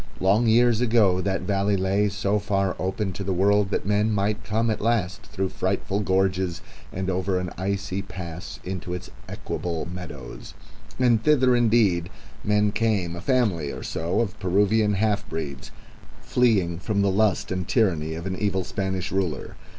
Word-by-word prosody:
Long 100 +5 +3
years 120 0 +4
ago 110 -6 +3
that 95 0 -1
valley 100 0 +1
lay 100 +2 +1
so 100 +1 0
far 100 -2 0
open 95 +1 -2
to 100 +3 -5
the 95 - -2
world 100 +2 +3
that - - -2
men 105 +2 +2
might 105 +2 0
come 110 +3 0
at 110 - -3
last 105 -4 0
through 95 -1 -2
frightful 95 +2 -1
gorges 95 -2 0 0.3
and 95 +1 -3
over 95 0 0
an 90 -2 -4
icy 100 +1 -2
pass 90 -3 -8
into 90 -1 -4
its 90 - -8 0.2
equable 85 -2 -4
meadows; 85 -8 -8 0.4
and 120 -4 +3
thither 130 -4 +4
indeed 110 -8 +3 0.3
men 105 0 +2
came, 105 -6 0
a 85 - -7
family 100 - +1
or - - -7
so 85 +6 -1
of 105 -5 -3
Peruvian 105 +3 +2
half 105 0 0
breeds 75 -4 -5 0.5
fleeing 100 -9 +2
from 100 +1 0
the 100 - +2
lust 100 -1 +1
and 95 -1 -2
tyranny 80 -9 +1
of 85 +2 -6
an 95 -1 -2
evil 95 -2 0
Spanish 95 0 -3
ruler. 95 -6 -2
100 Hz, 165 wpm, -25 LUFS, 90-105 Hz, 0.5 s, years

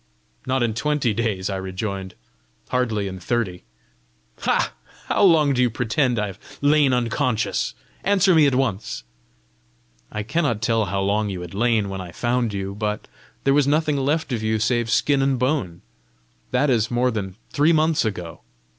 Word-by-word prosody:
"Not 130 -1 +1
in 115 -2 0
twenty 135 -1 0
days," 105 -4 -1
I 95 - -2
rejoined, 95 0 -4 0.5
"hardly 115 -5 0
in 95 -1 -6
thirty!" 95 -3 -2 0.7
"Ha! - - +1 0.3
How - - 0
long 160 -7 +5
do 125 - +1
you 125 - +4
pretend 125 +2 0
I 105 - +1
have 100 0 -8 0.2
lain 145 -1 +4
unconscious? 125 -1 0 0.3
Answer 195 -2 +4
me 155 -3 +6
at 135 - +1
once." 100 - -1 1.1
"I 105 - -3
cannot 120 -2 0
tell 115 -1 +1
how 95 +1 -2
long 105 +2 +1
you 95 -2 -4
had 90 0 -8
lain 110 0 +2
when 95 -1 -5
I 90 -2 -8
found 120 +2 0
you, 100 -1 -4
but 105 +1 -3 0.4
there 135 - +3
was 145 -1 +3
nothing 150 +1 +2
left 140 +1 0
of 115 - -1
you 110 0 +1
save 115 +1 0
skin 140 +3 +2
and 135 -1 +2
bone: 120 - -1 0.7
that 135 +3 +2
is 115 -3 +2
more 125 +1 +1
than 95 -4 -4 0.2
three 150 +2 +4
months 160 -1 +3
ago. 90 -7 -4
115 Hz, 170 wpm, -23 LUFS, 100-135 Hz, 1.1 s, me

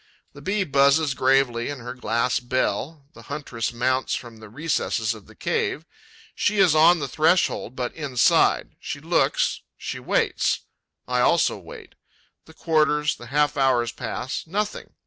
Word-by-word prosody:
The - - -12
Bee 200 +1 0
buzzes 140 -1 +3
gravely 130 -2 +2
in 145 - -4
her 125 0 -7
glass 115 0 0
bell; 130 +4 -2
the - - -13
huntress 140 -6 -3
mounts 130 +2 0
from 120 -2 -8
the 110 -1 -12
recesses 120 -4 -1
of 110 -4 -13
the - - -16
cave; - - -2 0.5
she 210 - 0
is 190 -5 +5
on 165 +3 +6
the 145 -3 -3
threshold, 155 - +1
but 125 -1 -3
inside; 140 -6 +2
she - - -6
looks; - - +1 0.2
she - - -5
waits. - - 0 0.5
I 125 0 0
also 170 +7 +3
wait. - - -12 0.5
The 160 - -16
quarters, 150 -2 +1
the 120 - -11
half 145 +3 +1
hours 125 -4 +2
pass: 130 +5 -5
nothing. 205 +5 -4
135 Hz, 150 wpm, -24 LUFS, 120-155 Hz, 0.5 s, on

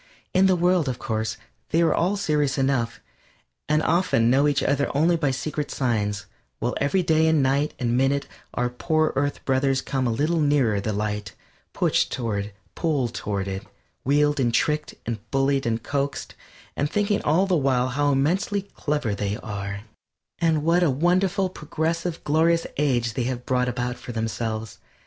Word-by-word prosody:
In 190 +1 +5
the 185 - +4
world, 175 -4 +2
of 125 - -3
course, 110 -3 -2 0.3
they 165 - +2
are 165 - +3
all 185 +5 +1
serious 150 -7 0
enough, 130 -4 0 0.7
and 155 +1 +3
often 160 -9 +2
know 140 +3 +4
each 145 -1 +1
other 140 0 +1
only 165 +4 +4
by 155 -4 +1
secret 150 +3 -3
signs, 105 -6 -1 0.3
while 120 - -1
every 180 +7 +2
day 160 -1 +3
and 160 -3 +3
night 140 +3 +1
and 120 -2 0
minute 135 +2 +2 0.3
our 125 - +1
poor 155 +6 0
earth 145 +1 -1
brothers 135 0 +2
come 130 -2 -1
a - - +1
little 155 +8 +1
nearer 140 -9 +2
the 110 - -2
light 105 -1 -3 0.4
pushed - - +1
toward 110 -5 -2
it, 100 -1 -12 0.2
pulled 140 -8 0
toward 100 -4 -3
it, 95 0 -4 0.4
wheedled 145 +2 +2
and 120 -3 +2
trickled 150 0 0
and 115 -1 -3
bullied 135 0 +1
and 115 0 -1
coaxed, 140 0 -2 0.4
and 145 +1 0
thinking 205 +2 +1
all 165 +6 +3
the 190 -2 +1
while 130 -4 +2
how 145 +3 +1
immensely 185 +9 +1
clever 145 - -2
they 100 +1 -2
are, 100 -1 -5 0.6
and 160 -3 +2
what 170 +3 +3
a 175 - +4
wonderful 180 +7 +2
progressive, 165 -1 -3
glorious 165 +3 +2
age 125 -6 +1
they 120 +1 -1
have 125 -1 -3
brought 125 -1 +1
about 125 0 -3
for - - -7
themselves. 110 -1 -3
140 Hz, 170 wpm, -24 LUFS, 120-160 Hz, 0.7 s, In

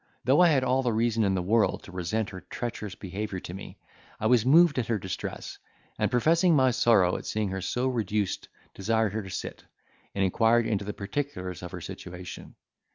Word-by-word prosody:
Though 135 +7 +4
I 180 - +7
had 135 -5 +3
all 130 +1 +2
the 125 -2 0
reason 115 0 +1
in 95 -2 +2
the 90 - -1
world 110 +4 +2
to - - -11
resent 95 +4 -2
her 95 -1 -8
treacherous 110 -5 -5
behaviour 95 0 -5
to 85 - -7
me, 95 - -9 0.4
I - - -3
was 120 0 +4
moved 160 -1 +6
at 115 - -2
her 115 - +1
distress, 95 -1 -6 0.4
and - - +2
professing 165 +7 +3
my 130 -2 +4
sorrow 105 -7 +3
at - - -8
seeing 105 -2 -1
her 95 0 -4
so 125 +7 -1
reduced 105 -5 -1 0.3
desired 110 +1 0
her 110 - -2
to 95 - -9
sit, - - -6 0.5
and 100 - +1
inquired 115 +5 +3
into 100 -3 -1
the 105 - -3
particulars 100 -5 -4
of 90 - -6
her - - -7
situation. 90 0 -9
110 Hz, 200 wpm, -27 LUFS, 95-125 Hz, 0.5 s, I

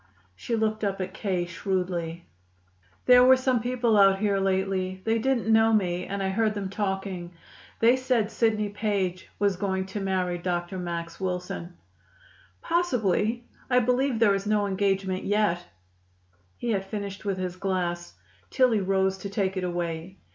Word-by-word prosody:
She 230 - -3
looked 220 -1 -1
up 195 -1 -1
at 185 0 -4
K. 185 -4 -1
shrewdly. 175 -2 -3 0.8
"There 250 0 +8
were 260 +1 +7
some 255 -2 +1
people 240 -1 +1
out 195 -1 +6
here 200 -1 +1
lately. 190 -1 0
They 225 0 +2
didn't 260 0 0
know 225 0 +5
me, 180 -4 0
and 200 0 -3
I 190 - 0
heard 215 +2 +1
them 195 -2 -3
talking. 195 -3 -3 0.5
They 235 +2 +6
said 250 -4 0
Sidney 215 -2 +1
Page 200 -3 -2
was 200 -2 +2
going 190 -1 -1
to 190 +2 -5
marry 185 -2 -1
Dr. 175 +1 -3
Max 170 -1 -5
Wilson." 180 -2 -4 0.9
"Possibly. 235 - +1 0.2
I 250 - +3
believe 250 +1 +2
there 220 -3 +4
is 195 +1 -2
no 210 -1 +2
engagement 195 -1 0
yet." 205 -4 +1 0.9
He 240 - -2
had 195 -3 0
finished 200 0 -5
with 200 -2 -1
his 180 -1 -3
glass. 180 -2 -2 0.3
Tillie 250 -6 +3
rose 190 0 +1
to 200 - -6
take 195 -1 -1
it 185 - -2
away. 175 +1 -3
195 Hz, 155 wpm, -26 LUFS, 185-220 Hz, 0.9 s, There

